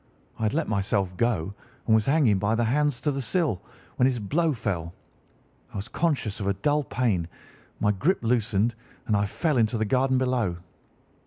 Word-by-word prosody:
I -, -, -7 dB
had 110 Hz, +4 st, +1 dB
let 165 Hz, -1 st, 0 dB
myself 100 Hz, -2 st, 0 dB
go, 105 Hz, -5 st, 0 dB, 0.3 s
and 110 Hz, -, +3 dB
was 110 Hz, -1 st, +3 dB
hanging 135 Hz, -9 st, +3 dB
by 105 Hz, +3 st, +1 dB
the 120 Hz, -, +1 dB
hands 145 Hz, +2 st, +1 dB
to 150 Hz, -, +1 dB
the 135 Hz, 0 st, -2 dB
sill, 140 Hz, -, 0 dB, 0.4 s
when 125 Hz, -, +4 dB
his 130 Hz, -2 st, 0 dB
blow 155 Hz, -, +1 dB
fell. 90 Hz, -, -3 dB, 0.8 s
I -, -, -14 dB
was 100 Hz, +1 st, -4 dB
conscious 145 Hz, -, -1 dB
of 100 Hz, -, -3 dB
a 100 Hz, -, +2 dB
dull 145 Hz, +9 st, +1 dB
pain, 110 Hz, -11 st, 0 dB, 0.5 s
my 105 Hz, -, +3 dB
grip 150 Hz, -, 0 dB
loosened, 115 Hz, -1 st, +1 dB, 0.3 s
and 110 Hz, -, +1 dB
I 100 Hz, 0 st, +1 dB
fell 150 Hz, -, 0 dB
into 115 Hz, +1 st, +2 dB
the 110 Hz, -, 0 dB
garden 130 Hz, +3 st, +2 dB
below. 125 Hz, -9 st, 0 dB
115 Hz, 185 wpm, -26 LUFS, 100-135 Hz, 0.8 s, when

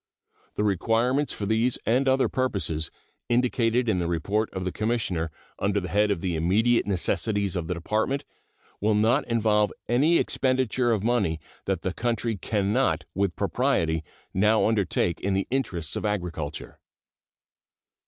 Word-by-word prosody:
The 105 Hz, -, 0 dB
requirements 115 Hz, -, +1 dB
for 105 Hz, -, -4 dB
these 110 Hz, +4 st, +2 dB
and 130 Hz, +4 st, +2 dB
other 130 Hz, 0 st, +3 dB
purposes, 85 Hz, -, -1 dB, 0.4 s
indicated 120 Hz, 0 st, +2 dB
in 100 Hz, -5 st, +2 dB
the 85 Hz, -, -1 dB
report 100 Hz, +6 st, 0 dB
of 95 Hz, -1 st, -4 dB
the 90 Hz, -, -1 dB
Commissioner 105 Hz, -8 st, -1 dB, 0.3 s
under 100 Hz, +1 st, +1 dB
the 90 Hz, -2 st, -5 dB
head 105 Hz, +4 st, +2 dB
of 100 Hz, -5 st, -1 dB
the 90 Hz, -2 st, -1 dB
immediate 105 Hz, +10 st, +2 dB
necessities 100 Hz, +1 st, 0 dB
of 85 Hz, -3 st, -2 dB
the 90 Hz, -, -2 dB
Department, 110 Hz, +10 st, -1 dB, 0.5 s
will 105 Hz, +1 st, +2 dB
not 115 Hz, +7 st, +2 dB
involve 105 Hz, -3 st, +2 dB, 0.2 s
any 145 Hz, +9 st, +4 dB
expenditure 130 Hz, -2 st, +1 dB
of 110 Hz, -4 st, +1 dB
money 110 Hz, -9 st, +1 dB, 0.3 s
that -, -, -1 dB
the -, -, -1 dB
country 115 Hz, -1 st, -1 dB
can 100 Hz, 0 st, -1 dB
not 100 Hz, -11 st, +1 dB
with 95 Hz, -2 st, 0 dB
propriety 80 Hz, -1 st, 0 dB, 0.3 s
now 105 Hz, +3 st, +3 dB
undertake 100 Hz, -5 st, +1 dB
in 95 Hz, 0 st, 0 dB
the 95 Hz, -, 0 dB
interests 90 Hz, -, -2 dB
of -, -, -3 dB
agriculture. 90 Hz, -8 st, -4 dB
105 Hz, 150 wpm, -26 LUFS, 90-120 Hz, 0.5 s, any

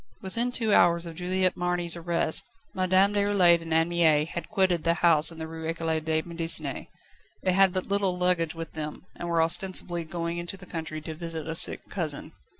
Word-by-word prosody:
Within 230 Hz, +6 st, -1 dB
two 225 Hz, -4 st, +1 dB
hours 170 Hz, 0 st, +4 dB
of 165 Hz, -, -7 dB
Juliette 185 Hz, +1 st, 0 dB
Marny's 175 Hz, -1 st, -1 dB
arrest, 170 Hz, -1 st, -1 dB, 0.3 s
Madame 185 Hz, +2 st, +3 dB
Déroulède 200 Hz, -4 st, +4 dB
and 165 Hz, 0 st, -8 dB
Anne 165 Hz, +1 st, +2 dB
Mie 160 Hz, -3 st, +3 dB
had 165 Hz, 0 st, -7 dB
quitted 185 Hz, -5 st, +1 dB
the 170 Hz, 0 st, +2 dB
house 165 Hz, -2 st, +3 dB
in 165 Hz, -, -12 dB
the 160 Hz, 0 st, -5 dB
Rue 160 Hz, 0 st, -7 dB
Ecole 165 Hz, -1 st, -1 dB
de 160 Hz, 0 st, -1 dB
Médecine. 165 Hz, -4 st, -1 dB, 0.6 s
They 185 Hz, -, +2 dB
had 195 Hz, 0 st, +5 dB
but 185 Hz, 0 st, -3 dB
little 200 Hz, -2 st, +1 dB
luggage 180 Hz, -2 st, +1 dB
with 165 Hz, 0 st, -7 dB
them, 155 Hz, +2 st, -6 dB
and 175 Hz, -, -6 dB
were 165 Hz, -1 st, +3 dB
ostensibly 175 Hz, 0 st, +2 dB
going 170 Hz, +1 st, -4 dB
into 175 Hz, +3 st, -6 dB
the 185 Hz, -, -11 dB
country 160 Hz, -2 st, -6 dB
to 160 Hz, +1 st, -6 dB
visit 165 Hz, -1 st, -6 dB
a 160 Hz, -, -3 dB
sick 165 Hz, -, +1 dB
cousin. 160 Hz, -7 st, -5 dB
170 Hz, 195 wpm, -27 LUFS, 160-185 Hz, 0.6 s, had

